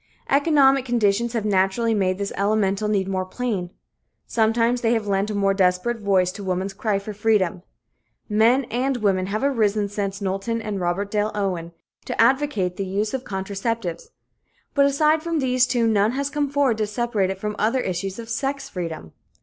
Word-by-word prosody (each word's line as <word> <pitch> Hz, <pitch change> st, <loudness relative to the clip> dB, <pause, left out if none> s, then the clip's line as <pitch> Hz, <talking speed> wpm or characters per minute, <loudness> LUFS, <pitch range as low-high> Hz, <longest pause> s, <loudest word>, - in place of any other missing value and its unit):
Economic 275 Hz, -2 st, +4 dB
conditions 235 Hz, -1 st, +1 dB
have 225 Hz, -3 st, -1 dB
naturally 205 Hz, +3 st, +2 dB
made 185 Hz, -3 st, +1 dB
this 200 Hz, 0 st, -3 dB
elemental 200 Hz, 0 st, +1 dB
need 200 Hz, -3 st, 0 dB
more 190 Hz, -1 st, -1 dB
plain; 190 Hz, -2 st, -3 dB, 0.6 s
sometimes 230 Hz, +2 st, +1 dB
they 230 Hz, 0 st, +2 dB
have 225 Hz, -2 st, 0 dB
lent 200 Hz, +1 st, 0 dB
a 210 Hz, -, -3 dB
more 195 Hz, -1 st, +2 dB
desperate 195 Hz, +5 st, +1 dB
voice 190 Hz, -3 st, +2 dB
to 200 Hz, -, -9 dB
woman's 190 Hz, +1 st, -2 dB
cry 205 Hz, +1 st, -1 dB
for 200 Hz, +2 st, -6 dB
freedom. 205 Hz, -4 st, +1 dB, 0.7 s
Men 230 Hz, +5 st, +3 dB
and 255 Hz, +3 st, 0 dB
women 195 Hz, -4 st, +1 dB
have 215 Hz, +5 st, -2 dB
arisen 215 Hz, -6 st, +1 dB
since 200 Hz, -1 st, -3 dB
Knowlton 195 Hz, +4 st, -2 dB
and 210 Hz, -3 st, -4 dB
Robert 185 Hz, +3 st, -1 dB
Dale 210 Hz, 0 st, +1 dB
Owen, 180 Hz, -5 st, -2 dB, 0.3 s
to -, -, -5 dB
advocate 230 Hz, -7 st, +2 dB
the 195 Hz, -, -2 dB
use 205 Hz, +3 st, -1 dB
of 265 Hz, -1 st, -3 dB
contraceptives, 195 Hz, -2 st, -3 dB, 0.7 s
but 280 Hz, -1 st, +4 dB
aside 305 Hz, +3 st, +2 dB
from 335 Hz, 0 st, -2 dB
these 255 Hz, -3 st, +2 dB
two 240 Hz, -3 st, +1 dB
none 215 Hz, 0 st, +2 dB
has 280 Hz, +1 st, -2 dB
come 290 Hz, -1 st, -1 dB
forward 275 Hz, -5 st, +1 dB
to 215 Hz, -, 0 dB
separate 210 Hz, -3 st, -1 dB
it 190 Hz, 0 st, -4 dB
from 210 Hz, +1 st, -3 dB
other 230 Hz, +5 st, +2 dB
issues 190 Hz, 0 st, -3 dB
of 230 Hz, -1 st, -7 dB
sex 270 Hz, +4 st, -2 dB
freedom. 165 Hz, -, -6 dB
210 Hz, 180 wpm, -23 LUFS, 195-240 Hz, 0.7 s, Economic